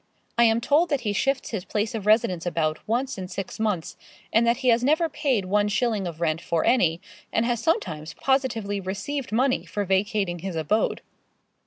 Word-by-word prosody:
I 235 - +5
am 225 0 +4
told 305 +7 +3
that 285 -4 0
he 210 -3 -1
shifts 270 +5 0
his 210 -6 -3
place 210 +3 -2
of 210 -3 -4
residence 185 -6 +3
about 155 -2 0
once 240 0 -1
in 185 - -5
six 190 +2 -6
months, 210 -7 -2 0.4
and 230 +1 +4
that 235 0 +3
he - - +5
has 235 +1 +4
never 310 +5 +3
paid 265 -9 0
one 205 +2 +2
shilling 210 -2 0
of 165 -2 -7
rent 165 -1 0
for 170 -1 0
any, 175 -10 +3 0.3
and 225 - +1
has 240 -1 0
sometimes 165 - -1
positively 225 -7 0
received 235 +9 -4
money 255 +4 +2
for 205 -1 -3
vacating 190 -1 0
his 185 0 -5
abode. 160 +8 0
210 Hz, 190 wpm, -25 LUFS, 185-245 Hz, 0.4 s, I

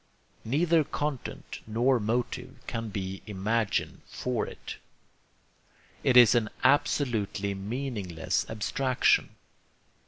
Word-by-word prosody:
Neither 160 +6 +3
content 145 -2 -4
nor 120 +4 +2
motive 120 +4 -2
can 115 -2 -4
be 95 -1 -4
imagined 105 +2 -1
for 125 -3 -2
it. - - -8 1.3
It 125 - +4
is 120 -2 +9
an 115 -3 +2
absolutely 120 -8 +2
meaningless 100 -5 -2
abstraction. 125 +4 +1
115 Hz, 90 wpm, -28 LUFS, 105-130 Hz, 1.3 s, is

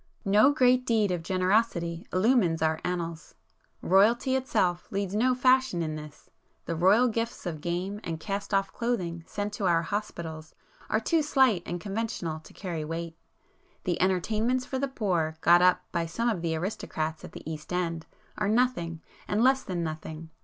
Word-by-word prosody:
No 210 +7 +5
great 255 -3 +4
deed 220 -5 +2
of 175 -2 -1
generosity 185 -2 0
illumines 185 -5 +2
our 160 0 +1
annals. 170 -2 -4 0.5
Royalty 230 +7 +4
itself 185 -9 0
leads 195 -1 -2
no 250 +4 +2
fashion 255 - +3
in 155 -1 -3
this,—the 150 +2 -10
royal 195 +9 +5
gifts 230 -1 -3
of 160 -4 -4
game 180 +5 -3
and 165 -1 -4
cast 200 +4 -4
off 195 -1 +1
clothing 180 -9 -2
sent 205 0 -4
to 200 -2 -1
our 170 -1 +3
hospitals 165 -5 -5 0.3
are 215 - +2
too 320 +8 +1
slight 265 - +3
and 175 - -3
conventional 195 -5 -3
to 160 - -16
carry 170 -5 -5
weight. 165 +1 -5 0.7
The 175 -2 -1
'entertainments 215 +7 +1
for 265 - -3
the 275 - 0
poor' 175 -11 -1
got 175 +1 +6
up 180 0 +4
by 170 -1 -1
some 230 +9 -1
of 200 -7 -1
the 165 -1 -1
aristocrats 160 -3 -3
at - - -10
the - - -10
East 155 0 -7
end, 170 -2 -2 0.3
are 210 -1 +1
nothing, 215 -9 +1 0.3
and 210 +3 +1
less 265 +1 +4
than 175 -2 -3
nothing. 160 0 -6
185 Hz, 165 wpm, -28 LUFS, 165-225 Hz, 0.7 s, got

